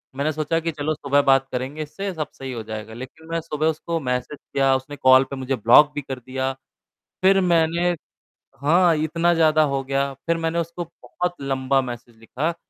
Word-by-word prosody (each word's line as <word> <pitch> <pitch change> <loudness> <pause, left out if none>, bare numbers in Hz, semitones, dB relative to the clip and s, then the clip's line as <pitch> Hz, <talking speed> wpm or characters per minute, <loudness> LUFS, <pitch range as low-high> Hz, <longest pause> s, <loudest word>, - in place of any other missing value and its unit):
मैंने 145 +3 0
सोचा 155 +2 0
कि 165 0 -2
चलो 150 +1 -2
सुबह 140 -1 +2
बात 135 0 +4
करेंगे 130 +5 -4
इससे 195 +6 -5
सब 155 -3 -3
सही 135 -1 -7
हो 115 -2 -5
जाएगा 110 +1 -6
लेकिन 130 +7 -10
मैं 165 - 0
सुबह 155 -1 -2
उसको 165 +1 -3
मैसेज 125 +3 -2 0.2
किया, 135 -1 +3
उसने 130 +2 -5
कॉल 130 -1 +6
पे 140 - -5
मुझे 130 0 -2
ब्लॉक 125 +7 +6
भी 145 - -2
कर 130 -1 -6
दिया, 130 +2 -3 0.7
फिर 195 +1 +5
मैंने 170 +2 +2 0.7
हाँ, 170 +4 +4
इतना 165 +3 +1
ज़्यादा 155 -1 +4
हो 135 - 0
गया, 140 0 -1
फिर 170 0 +2
मैंने 165 +1 0
उसको 170 +1 -3
बहुत 175 +1 -5
लंबा 135 0 +1
मैसेज 120 -2 -8
लिखा 125 +7 -3
अ, 170 - -6
145 Hz, 195 wpm, -23 LUFS, 130-165 Hz, 0.7 s, कॉल